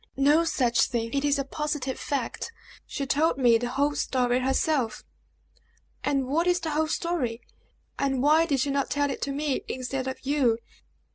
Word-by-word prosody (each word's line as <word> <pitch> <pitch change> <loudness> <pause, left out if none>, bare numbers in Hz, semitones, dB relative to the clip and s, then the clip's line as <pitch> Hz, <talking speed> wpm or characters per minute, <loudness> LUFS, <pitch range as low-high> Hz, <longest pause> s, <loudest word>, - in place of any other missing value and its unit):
"No 290 +4 +4
such 245 -7 +2
thing! 230 -1 -3
It 280 0 0
is 290 0 +2
a 275 - 0
positive 295 -1 -3
fact! 275 - -3 0.4
She 275 - -3
told 290 +1 +2
me 240 -4 +5
the 245 0 -2
whole 285 +3 +1
story 250 -3 +1
herself!" 265 -1 0 1.0
"And 275 -2 +1
what 320 +7 0
is 355 0 +3
the 325 -2 -3
whole 310 +1 +1
story; 310 -9 -2 0.6
and 270 -2 0
why 315 +3 +5
did 275 -5 +1
she 280 - 0
not 275 0 0
tell 285 -1 +1
it - - -6
to 280 - -1
me 285 -1 -1
instead 260 +1 -3
of 260 - -3
you." 265 -5 +2
275 Hz, 180 wpm, -26 LUFS, 255-295 Hz, 1.0 s, me